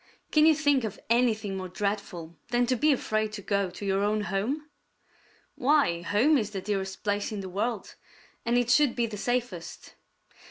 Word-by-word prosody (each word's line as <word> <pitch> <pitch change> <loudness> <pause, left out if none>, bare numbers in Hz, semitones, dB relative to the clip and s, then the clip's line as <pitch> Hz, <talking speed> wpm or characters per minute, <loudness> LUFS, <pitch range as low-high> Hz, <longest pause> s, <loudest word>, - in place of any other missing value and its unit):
Can 305 0 +5
you 320 - +6
think 290 -4 +2
of 215 -3 -4
anything 225 -4 +2
more 185 -1 -5
dreadful 185 -4 -4
than 245 0 +2
to 255 +1 +1
be 300 +5 +3
afraid 215 -5 0
to 205 -2 -6
go 200 -1 0
to 185 +3 -8
your 195 0 +1
own 210 +1 +1
home? 215 +10 -2 0.9
Why, 260 - +2
home 240 - +3
is 210 -3 -2
the 200 -2 -4
dearest 190 -1 -3
place 205 0 -1
in 210 -2 -4
the 190 - -6
world, 210 +3 -3 0.5
and 235 +1 +1
it 245 -1 +2
should 280 -1 +4
be 235 - +1
the 215 -2 -6
safest. 240 -7 -3
215 Hz, 185 wpm, -28 LUFS, 195-245 Hz, 0.9 s, you